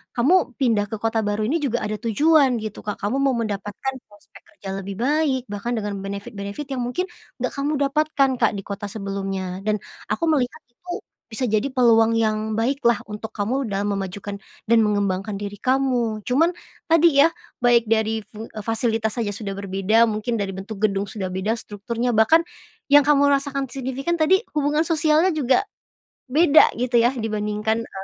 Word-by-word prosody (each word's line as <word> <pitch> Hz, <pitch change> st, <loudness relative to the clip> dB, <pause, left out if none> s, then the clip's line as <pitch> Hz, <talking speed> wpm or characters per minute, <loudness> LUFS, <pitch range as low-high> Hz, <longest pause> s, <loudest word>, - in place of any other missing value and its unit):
kamu 270 Hz, +10 st, +4 dB, 0.2 s
pindah 225 Hz, -6 st, +2 dB
ke -, -, -2 dB
kota 225 Hz, +1 st, 0 dB
baru 205 Hz, +1 st, -1 dB
ini 320 Hz, +6 st, +1 dB
juga 245 Hz, -4 st, 0 dB
ada 215 Hz, 0 st, -2 dB
tujuan 270 Hz, +2 st, +3 dB
gitu, 215 Hz, -1 st, -6 dB
Kak, 210 Hz, -, -4 dB
kamu 225 Hz, +7 st, 0 dB
mau 270 Hz, -2 st, +2 dB
mendapatkan 205 Hz, +4 st, -3 dB, 0.2 s
prospek 205 Hz, 0 st, -18 dB, 0.2 s
kerja 195 Hz, -, -8 dB
lebih 195 Hz, 0 st, -6 dB
baik, 275 Hz, +1 st, +1 dB
bahkan 205 Hz, +4 st, -3 dB
dengan 210 Hz, -1 st, -3 dB
benefit-benefit 200 Hz, +5 st, -6 dB
yang 250 Hz, -, -2 dB
mungkin 250 Hz, +10 st, -2 dB, 0.3 s
nggak 255 Hz, -, -1 dB
kamu 280 Hz, +2 st, -1 dB, 0.2 s
dapatkan, 295 Hz, -2 st, +2 dB
Kak, 225 Hz, -, +4 dB
di 195 Hz, -, -6 dB
kota 205 Hz, 0 st, -5 dB
sebelumnya 195 Hz, -2 st, -4 dB
dan 215 Hz, 0 st, +1 dB, 0.3 s
aku 335 Hz, -, -1 dB
melihat 280 Hz, -6 st, 0 dB
itu 350 Hz, +9 st, -8 dB, 0.3 s
bisa 250 Hz, +3 st, -1 dB
jadi 220 Hz, +5 st, 0 dB
peluang 230 Hz, -3 st, +4 dB
yang 220 Hz, -1 st, 0 dB
baik 270 Hz, +5 st, -1 dB
lah, 235 Hz, -2 st, +4 dB
untuk 210 Hz, +1 st, -7 dB
kamu 240 Hz, +7 st, -1 dB
dalam 200 Hz, +1 st, -1 dB
memajukan 200 Hz, +1 st, -5 dB, 0.3 s
dan 230 Hz, 0 st, +5 dB
mengembangkan 200 Hz, -1 st, -1 dB
diri 205 Hz, 0 st, -5 dB
kamu. 250 Hz, -3 st, 0 dB
Cuman 320 Hz, +8 st, +3 dB, 0.4 s
tadi 320 Hz, -3 st, +6 dB
ya, 330 Hz, -, +4 dB, 0.3 s
baik 235 Hz, -2 st, +4 dB
dari 220 Hz, 0 st, +1 dB
fu 215 Hz, +2 st, -11 dB
eee, 215 Hz, -, -7 dB
fasilitas 225 Hz, 0 st, -1 dB
saja 220 Hz, -4 st, -1 dB
sudah 200 Hz, -1 st, -5 dB
berbeda, 200 Hz, +3 st, +2 dB
mungkin 215 Hz, +3 st, -2 dB
dari 200 Hz, -3 st, -2 dB
bentuk 195 Hz, +2 st, -7 dB
gedung 200 Hz, -1 st, +1 dB
sudah 190 Hz, -2 st, -5 dB
beda 195 Hz, +5 st, -1 dB
strukturnya, 230 Hz, +3 st, -3 dB
bahkan 275 Hz, +10 st, +4 dB, 0.5 s
yang 290 Hz, 0 st, +7 dB
kamu 285 Hz, -1 st, +5 dB
rasakan 275 Hz, 0 st, 0 dB
signifikan 275 Hz, +5 st, -3 dB
tadi, 380 Hz, +7 st, +4 dB
hubungan 300 Hz, +1 st, +1 dB
sosialnya 320 Hz, +2 st, +3 dB
juga 270 Hz, -1 st, +2 dB, 0.7 s
beda 310 Hz, +2 st, +6 dB
gitu 240 Hz, -1 st, +2 dB
ya, 240 Hz, -, +4 dB
dibandingkan, 215 Hz, 0 st, -1 dB
eee, 230 Hz, -, -10 dB
225 Hz, 170 wpm, -22 LUFS, 205-275 Hz, 0.7 s, yang